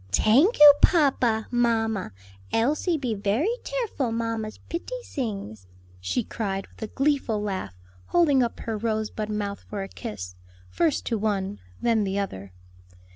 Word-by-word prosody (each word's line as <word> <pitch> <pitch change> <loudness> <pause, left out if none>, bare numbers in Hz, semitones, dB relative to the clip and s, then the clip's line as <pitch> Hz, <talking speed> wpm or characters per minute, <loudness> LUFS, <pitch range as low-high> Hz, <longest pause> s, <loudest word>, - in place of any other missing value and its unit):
"Tank 250 - +4
oo, 295 -1 +10
papa, 260 - +3
mamma; 225 - +1 0.4
Elsie 295 +9 +1
be 255 -6 -2
very 220 - 0
tareful 450 - -2
mamma's 225 -1 -3
pitty 425 +9 -4
sings," 195 - -5 0.3
she 90 - -1
cried 195 -3 -3
with - - -21
a 220 - -3
gleeful 275 -6 +1
laugh, 190 - -4 0.3
holding 295 -7 +4
up 235 -2 -2
her 225 - -3
rosebud 215 -1 -2
mouth 205 -1 -3
for 205 -2 -3
a - - -6
kiss, 90 - -7 0.4
first 325 -4 +1
to 230 -3 -1
one, 195 - -1 0.2
then 225 -3 +3
the 195 0 -2
other. 100 - -4
225 Hz, 140 wpm, -25 LUFS, 200-270 Hz, 0.4 s, oo